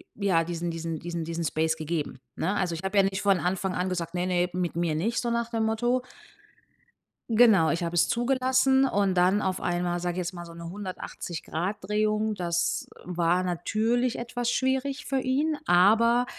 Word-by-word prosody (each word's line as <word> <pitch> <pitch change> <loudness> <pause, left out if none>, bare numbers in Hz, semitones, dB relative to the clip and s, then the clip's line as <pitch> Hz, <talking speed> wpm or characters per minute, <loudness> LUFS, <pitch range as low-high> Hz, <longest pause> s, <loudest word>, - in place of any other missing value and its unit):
ja, 190 -5 +2
diesen 170 0 -3
diesen 165 0 -4
diesen 170 -1 -4
diesen 170 +1 -3
Space 160 +1 0
gegeben, 155 -4 -4 0.2
ne? 190 +5 -1
Also, 180 -4 0
ich 165 - -6
habe 190 +2 -1
ja 195 - +7
nicht 195 0 -1
von 195 -2 +3
Anfang 185 +1 -1
an 185 +1 -1
gesagt: 175 -1 -3
„Ne, 180 - 0
ne, 180 -1 +1
mit 180 -2 -2
mir 170 -2 0
nicht“, 225 +10 0
so 240 - -2
nach 235 0 -1
dem 225 -1 0
Motto. 240 +3 +1 1.3
Genau, 220 -8 +5
ich 170 +1 -1
habe 170 0 -3
es 170 - +3
zugelassen 260 +2 +3
und 200 -7 +2
dann 185 +4 +3
auf 190 -1 -1
einmal, 175 0 -1
sage 175 -1 -1
ich - - -8
jetzt 180 0 -3
mal, 175 -1 -7
so 170 - -11
'ne 170 0 -8
180°- 185 -1 -5
Drehung, 215 +2 0
das 170 -1 -1 0.2
war 175 0 +1
natürlich 220 +8 0
etwas 240 0 -2
schwierig 265 +2 -1
für 270 - 0
ihn, 290 +4 0
aber, 225 +7 +5
185 Hz, 185 wpm, -27 LUFS, 175-230 Hz, 1.3 s, ja